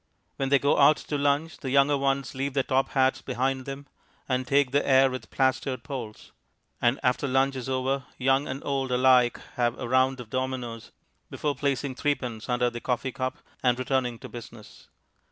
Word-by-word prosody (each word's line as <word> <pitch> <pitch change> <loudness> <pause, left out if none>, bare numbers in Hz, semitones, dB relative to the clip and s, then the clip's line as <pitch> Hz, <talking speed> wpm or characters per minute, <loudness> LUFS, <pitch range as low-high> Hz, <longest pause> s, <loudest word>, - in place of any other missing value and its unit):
When 135 -1 -1
they 140 - +6
go 140 +2 +2
out 145 +2 +6
to 150 - -5
lunch, 145 +3 0
the 135 - -5
younger 140 +2 +4
ones 135 -2 -1
leave 135 +1 -3
their 135 - +2
top 135 +1 +1
hats 130 -1 +2
behind 130 +1 -2
them, 140 +1 -7 0.4
and 130 -1 -1
take 140 -2 +3
the 145 +1 +2
air 135 -1 +5
with 130 - -7
plastered 130 -2 0
polls; 125 -7 -7 0.5
and 120 +3 +2
after 125 +2 +1
lunch 135 +1 +2
is 130 0 -5
over, 130 +1 -1
young 135 +3 +2
and 135 +2 -5
old 135 -2 -1
alike 125 -1 +4 0.2
have 120 -1 +1
a 125 - -5
round 130 +1 +2
of 120 -3 -10
dominoes 130 -3 -4 0.4
before 150 -1 -2
placing 140 -1 -1
threepence 125 -5 -2
under 125 0 +1
the 120 0 -7
coffee 130 +1 -1
cup 130 +1 -3 0.2
and 125 -1 +2
returning 130 -2 -1
to - - -10
business. 115 -2 -12
130 Hz, 185 wpm, -27 LUFS, 125-140 Hz, 0.5 s, they